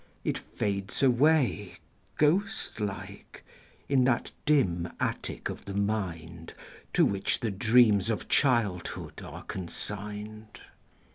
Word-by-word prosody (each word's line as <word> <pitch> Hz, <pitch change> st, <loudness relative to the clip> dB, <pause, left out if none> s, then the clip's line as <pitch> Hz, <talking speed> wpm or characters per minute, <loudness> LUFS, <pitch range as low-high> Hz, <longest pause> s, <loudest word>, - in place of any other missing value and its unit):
It -, -, -1 dB
fades 100 Hz, +4 st, -3 dB
away, 130 Hz, -, +3 dB, 0.4 s
Ghost 180 Hz, -, +1 dB
like, 100 Hz, -1 st, -6 dB, 0.4 s
in 135 Hz, -2 st, +4 dB
that 120 Hz, -2 st, +1 dB, 0.2 s
dim 90 Hz, -, +2 dB
attic -, -, -2 dB
of -, -, -7 dB
the 100 Hz, -, -5 dB
mind 85 Hz, -6 st, -3 dB, 0.4 s
To -, -, +5 dB
which 100 Hz, -1 st, 0 dB
the 115 Hz, -, -1 dB
dreams 110 Hz, 0 st, +4 dB
of 110 Hz, -, -2 dB
childhood 115 Hz, -10 st, 0 dB
are -, -, -9 dB
consigned. 105 Hz, +3 st, -6 dB
105 Hz, 110 wpm, -29 LUFS, 95-125 Hz, 0.4 s, To